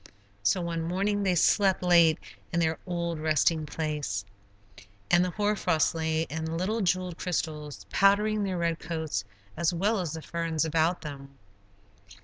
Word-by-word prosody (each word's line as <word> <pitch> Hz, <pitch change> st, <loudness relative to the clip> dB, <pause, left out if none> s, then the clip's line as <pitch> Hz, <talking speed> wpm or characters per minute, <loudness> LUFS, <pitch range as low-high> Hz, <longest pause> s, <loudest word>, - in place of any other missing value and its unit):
So 180 Hz, -, +2 dB
one 170 Hz, -1 st, -2 dB
morning 195 Hz, +5 st, 0 dB
they 190 Hz, -2 st, +2 dB
slept 190 Hz, +2 st, +3 dB
late 170 Hz, -3 st, +5 dB, 0.3 s
in 170 Hz, -, 0 dB
their 160 Hz, -1 st, +1 dB
old 170 Hz, -2 st, -2 dB
resting 155 Hz, 0 st, +2 dB
place, 150 Hz, -11 st, -3 dB, 0.9 s
and 175 Hz, 0 st, +6 dB
the 180 Hz, -, 0 dB
hoar 210 Hz, +3 st, 0 dB
frost 165 Hz, -6 st, +1 dB
lay 160 Hz, -1 st, 0 dB
in 160 Hz, +1 st, -4 dB
little 210 Hz, +6 st, -1 dB
jeweled 185 Hz, -2 st, 0 dB
crystals, 155 Hz, -5 st, -3 dB
powdering 210 Hz, +2 st, +3 dB
their 190 Hz, -2 st, -2 dB
red 170 Hz, -1 st, 0 dB
coats 160 Hz, -11 st, -3 dB, 0.3 s
as 170 Hz, +1 st, +1 dB
well 205 Hz, +5 st, +1 dB
as 170 Hz, -4 st, -3 dB
the 160 Hz, -1 st, -6 dB
ferns 165 Hz, -2 st, -1 dB
about 160 Hz, +2 st, +1 dB
them. 140 Hz, -2 st, -9 dB
170 Hz, 150 wpm, -28 LUFS, 160-185 Hz, 0.9 s, and